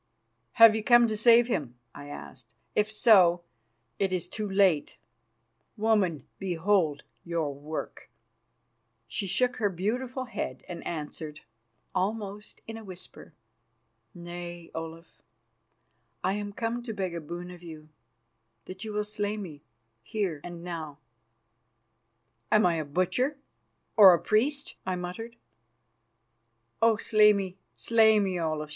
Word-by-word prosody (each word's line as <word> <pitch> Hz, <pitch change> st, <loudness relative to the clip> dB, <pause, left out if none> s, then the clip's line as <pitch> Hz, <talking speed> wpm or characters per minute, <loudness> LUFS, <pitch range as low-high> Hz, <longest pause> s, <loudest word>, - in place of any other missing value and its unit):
"Have 225 Hz, -1 st, +8 dB
you 220 Hz, -, -2 dB
come 240 Hz, +1 st, +6 dB
to 220 Hz, -2 st, -1 dB
save 235 Hz, +2 st, +6 dB
him?" 135 Hz, -, -3 dB, 0.2 s
I 145 Hz, -, -10 dB
asked. 125 Hz, -5 st, -11 dB, 0.2 s
"If 210 Hz, +1 st, +2 dB
so, 185 Hz, -6 st, +5 dB, 0.6 s
it 195 Hz, -1 st, +1 dB
is 185 Hz, -2 st, -1 dB
too 215 Hz, -1 st, -4 dB
late. 190 Hz, -6 st, +2 dB, 0.8 s
Woman, 205 Hz, -, +1 dB
behold 175 Hz, -4 st, +1 dB, 0.2 s
your 165 Hz, -4 st, -2 dB
work." 150 Hz, +3 st, -7 dB, 1.0 s
She 155 Hz, -, -3 dB
shook 245 Hz, +6 st, +1 dB
her 210 Hz, -2 st, +1 dB
beautiful 240 Hz, +8 st, -2 dB
head 130 Hz, -, -5 dB
and 175 Hz, -2 st, -7 dB
answered, 155 Hz, -1 st, -6 dB, 0.5 s
almost 205 Hz, +1 st, -3 dB
in 225 Hz, 0 st, -7 dB
a 225 Hz, -, -10 dB
whisper: 185 Hz, -4 st, -11 dB, 0.8 s
"Nay, 175 Hz, 0 st, -8 dB
Olaf, 165 Hz, +1 st, -8 dB, 1.0 s
I 190 Hz, -, +1 dB
am 205 Hz, 0 st, -4 dB
come 230 Hz, +3 st, -3 dB
to 235 Hz, -2 st, -6 dB
beg 190 Hz, -3 st, -2 dB
a 170 Hz, -, -4 dB
boon 175 Hz, +3 st, -7 dB
of 175 Hz, -1 st, -12 dB
you: 155 Hz, -3 st, -11 dB, 0.8 s
that 185 Hz, +2 st, -8 dB
you 215 Hz, -1 st, -5 dB
will 210 Hz, 0 st, 0 dB
slay 210 Hz, 0 st, -2 dB
me, 165 Hz, -8 st, -8 dB, 0.4 s
here 180 Hz, -, -3 dB
and 175 Hz, -1 st, -8 dB
now." 160 Hz, -5 st, -6 dB, 1.5 s
"Am 215 Hz, -1 st, +5 dB
I 170 Hz, -2 st, +2 dB
a 155 Hz, -, -2 dB
butcher 185 Hz, -, 0 dB, 0.6 s
or 195 Hz, -4 st, +9 dB
a -, -, -3 dB
priest?" 275 Hz, +7 st, 0 dB
I 185 Hz, -, -2 dB
muttered. 180 Hz, +7 st, -6 dB, 1.5 s
"Oh, 225 Hz, -1 st, +5 dB
slay 210 Hz, -1 st, +5 dB
me, 190 Hz, -2 st, -4 dB, 0.2 s
slay 220 Hz, -2 st, +4 dB
me, 190 Hz, -3 st, 0 dB
Olaf!" 155 Hz, -2 st, -2 dB
190 Hz, 130 wpm, -28 LUFS, 170-215 Hz, 1.5 s, or